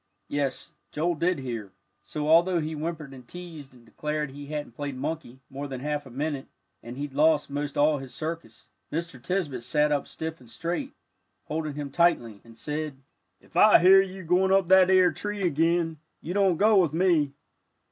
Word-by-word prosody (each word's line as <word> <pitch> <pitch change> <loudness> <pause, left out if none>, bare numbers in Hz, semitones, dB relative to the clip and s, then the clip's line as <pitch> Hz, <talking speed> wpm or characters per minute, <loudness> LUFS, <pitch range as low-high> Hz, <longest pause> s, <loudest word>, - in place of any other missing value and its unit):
Yes, 140 -2 -2 0.2
Joel 170 +3 0
did 170 +3 0
hear, 115 -7 -6 0.3
so 150 -1 -4
although 170 +3 +5
he 155 0 -3
whimpered 155 -2 -5
and 125 -2 -13
teased, 165 -5 -10
and 120 -1 -19
declared 150 +3 -3
he 145 +1 -9
hadn't 150 -3 -5
played 140 -1 -5
monkey 140 -3 -5
more 140 +2 -6
than 130 -2 -6
a - - -9
half 150 -1 -2
a - - -11
minute, 140 +2 -3 0.3
and 120 +2 -9
he'd 145 -1 -5
lost 150 0 +3
most 145 0 -3
all 150 0 +3
his 135 -1 -9
circus, 155 -8 -6 0.3
Mr. 160 -5 -4
Tisbett 155 -7 -2
sat 150 +5 +1
up 145 -1 0
stiff 160 0 -6
and 125 -3 -17
straight, 175 - -4 0.5
holding 155 -1 -4
him 145 -2 -5
tightly, 120 - +2
and 115 -1 -16
said, 150 +2 -4 0.4
"If - - -25
I - - +8
hear 190 +2 +7
of 195 - -3
you 190 0 -9
goin' 180 +3 +2
up 195 -2 +3
that 190 -1 +7
ere 185 -1 +5
tree 205 -1 -4
again, 165 0 +1 0.2
you 175 - -5
don't 195 -4 +3
go 215 +2 +5
with 170 -6 +3
me." 165 -5 +2
150 Hz, 190 wpm, -27 LUFS, 140-170 Hz, 0.5 s, I